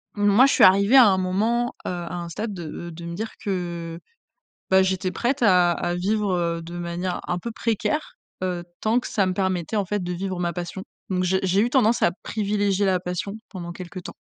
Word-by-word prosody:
moi 205 Hz, +4 st, +5 dB
je 275 Hz, -, +3 dB
suis -, -, +4 dB
arrivée 200 Hz, +6 st, +6 dB
à 255 Hz, -, +10 dB
un 190 Hz, -, +3 dB
moment, 220 Hz, +6 st, 0 dB
heu, -, -, -2 dB
à 175 Hz, -1 st, -4 dB
un 170 Hz, -1 st, -5 dB
stade 210 Hz, +5 st, -4 dB
de 175 Hz, -1 st, -7 dB
de 170 Hz, +1 st, -9 dB
me 170 Hz, 0 st, -5 dB
dire 220 Hz, +4 st, -4 dB
que 170 Hz, -4 st, -3 dB, 0.7 s
bah, 190 Hz, 0 st, +6 dB
j'étais 190 Hz, 0 st, 0 dB
prête 250 Hz, +5 st, -1 dB
à 180 Hz, -4 st, +5 dB
à 175 Hz, +1 st, -2 dB
vivre, 200 Hz, +2 st, 0 dB
heu, 170 Hz, -1 st, -1 dB
de 170 Hz, +1 st, -8 dB
manière 175 Hz, +1 st, -3 dB
un 180 Hz, -, -1 dB
peu 235 Hz, -, -5 dB
précaire, 230 Hz, +8 st, -2 dB, 0.3 s
heu, 180 Hz, -2 st, -2 dB, 0.2 s
tant 225 Hz, +3 st, +2 dB
que -, -, -7 dB
ça 200 Hz, -4 st, +1 dB
me 185 Hz, -, 0 dB
permettait 190 Hz, +1 st, -1 dB
en 205 Hz, -, +1 dB
fait 205 Hz, +1 st, -2 dB
de 180 Hz, -, -3 dB
vivre 185 Hz, +1 st, -3 dB
ma 175 Hz, -1 st, 0 dB
passion. 175 Hz, +2 st, -5 dB, 0.3 s
Donc 185 Hz, 0 st, 0 dB
j'ai 190 Hz, +1 st, +1 dB
j'ai 190 Hz, +2 st, +2 dB
eu 240 Hz, -, +1 dB
tendance 240 Hz, -3 st, +3 dB
à -, -, +5 dB
privilégier 205 Hz, -2 st, 0 dB
la 185 Hz, -2 st, +2 dB
passion 180 Hz, +3 st, -4 dB
pendant 175 Hz, -3 st, -7 dB
quelque 180 Hz, +1 st, -8 dB
temps. -, -, -9 dB
185 Hz, 220 wpm, -24 LUFS, 175-210 Hz, 0.7 s, à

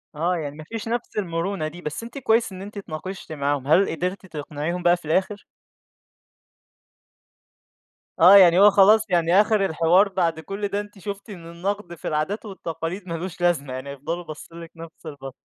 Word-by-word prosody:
آه، 170 Hz, +4 st, 0 dB
يعني 145 Hz, -2 st, -5 dB
ما 155 Hz, -, -8 dB
فيش 225 Hz, +7 st, -7 dB
نفس 240 Hz, -1 st, -4 dB
المرونة 170 Hz, -2 st, -2 dB
دي، 175 Hz, +3 st, -9 dB
بس 150 Hz, +8 st, -5 dB
أنتِ 235 Hz, +4 st, -9 dB
كويس 230 Hz, -4 st, +2 dB
إن 185 Hz, -, -8 dB
أنتِ 205 Hz, +1 st, -9 dB
اتناقشتِ 190 Hz, -1 st, -7 dB
معاهم، 140 Hz, -2 st, -2 dB
هل 185 Hz, +6 st, +4 dB
قدرتِ 180 Hz, +4 st, -3 dB
تقنعيهم 155 Hz, +1 st, -5 dB
بقى 175 Hz, 0 st, +4 dB
في 175 Hz, -, -17 dB
الآخر؟ 190 Hz, +6 st, -1 dB, 2.7 s
آه، 180 Hz, +4 st, +8 dB
يعني 180 Hz, -2 st, +7 dB
هو 205 Hz, +1 st, +8 dB
خلاص 210 Hz, +3 st, +6 dB
يعني 175 Hz, +2 st, +4 dB
آخر 210 Hz, -2 st, +2 dB
الحوار 175 Hz, +4 st, +3 dB
بعد 170 Hz, -4 st, 0 dB
كل 200 Hz, +5 st, -4 dB
ده 200 Hz, +1 st, -2 dB
أنتِ 205 Hz, -1 st, -9 dB
شُفتِ 200 Hz, +3 st, -7 dB
إن 170 Hz, -4 st, -9 dB
النقد 180 Hz, 0 st, -4 dB
في -, -, -8 dB
العادات 155 Hz, +9 st, -2 dB
والتقاليد 175 Hz, -1 st, -6 dB
ما 170 Hz, -, -4 dB
لوش 175 Hz, +2 st, -6 dB
لازمة، 150 Hz, -7 st, +1 dB
يعني 130 Hz, +2 st, -6 dB
هيفضلوا 155 Hz, +6 st, -5 dB
باصّين 165 Hz, +2 st, -10 dB
لِك 165 Hz, -, -11 dB
نفس 165 Hz, 0 st, -12 dB
البصّة. 140 Hz, -4 st, -8 dB
175 Hz, 180 wpm, -23 LUFS, 160-200 Hz, 2.7 s, آه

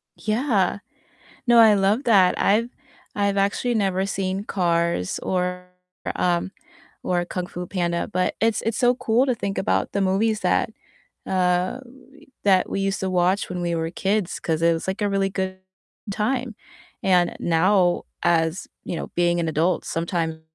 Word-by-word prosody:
Yeah, 215 Hz, -4 st, 0 dB, 0.7 s
no, 240 Hz, -1 st, +6 dB
I 220 Hz, -2 st, +8 dB
love 205 Hz, +6 st, +2 dB
that, 195 Hz, -6 st, +4 dB
I've 225 Hz, +4 st, +2 dB, 0.5 s
I've 200 Hz, -1 st, 0 dB
actually 200 Hz, +5 st, +1 dB
never 190 Hz, -3 st, +1 dB
seen 195 Hz, 0 st, -2 dB
Cars 170 Hz, -, 0 dB
or, 180 Hz, 0 st, -2 dB, 0.5 s
um 175 Hz, +1 st, 0 dB, 0.5 s
or 175 Hz, -1 st, 0 dB
Kung 180 Hz, 0 st, -4 dB
Fu 180 Hz, 0 st, -6 dB
Panda, 170 Hz, -2 st, -2 dB
but 185 Hz, 0 st, 0 dB
it's 225 Hz, 0 st, +2 dB
it's 225 Hz, -2 st, -1 dB
so 245 Hz, 0 st, +3 dB
cool 235 Hz, +2 st, +2 dB
to 255 Hz, -3 st, 0 dB
think 200 Hz, -3 st, -4 dB
about 205 Hz, -, 0 dB
the 200 Hz, -, -1 dB
movies 210 Hz, +3 st, +1 dB
that -, -, +1 dB, 0.6 s
uh, 180 Hz, +4 st, +1 dB, 0.6 s
that 190 Hz, -2 st, +3 dB
we -, -, -2 dB
used 195 Hz, 0 st, -1 dB
to 190 Hz, -, -2 dB
watch 185 Hz, +2 st, +1 dB
when 180 Hz, -1 st, -4 dB
we 170 Hz, -1 st, -1 dB
were 165 Hz, 0 st, -2 dB
kids 195 Hz, +1 st, -1 dB
'cause 165 Hz, 0 st, -2 dB
it 170 Hz, -, +5 dB
was, 165 Hz, -, -3 dB
like, 190 Hz, +3 st, -3 dB
a 205 Hz, -, +2 dB
really 195 Hz, -1 st, +1 dB
good 190 Hz, 0 st, -3 dB, 0.5 s
time. 245 Hz, +2 st, -1 dB, 0.5 s
And 180 Hz, -2 st, +2 dB
now 175 Hz, +2 st, +2 dB, 0.2 s
as 165 Hz, 0 st, +1 dB, 0.2 s
you -, -, -4 dB
know, -, -, -6 dB
being 175 Hz, 0 st, +2 dB
an 165 Hz, -, -1 dB
adult, 160 Hz, +4 st, 0 dB
sometimes 165 Hz, -1 st, -2 dB
190 Hz, 160 wpm, -23 LUFS, 175-205 Hz, 0.7 s, I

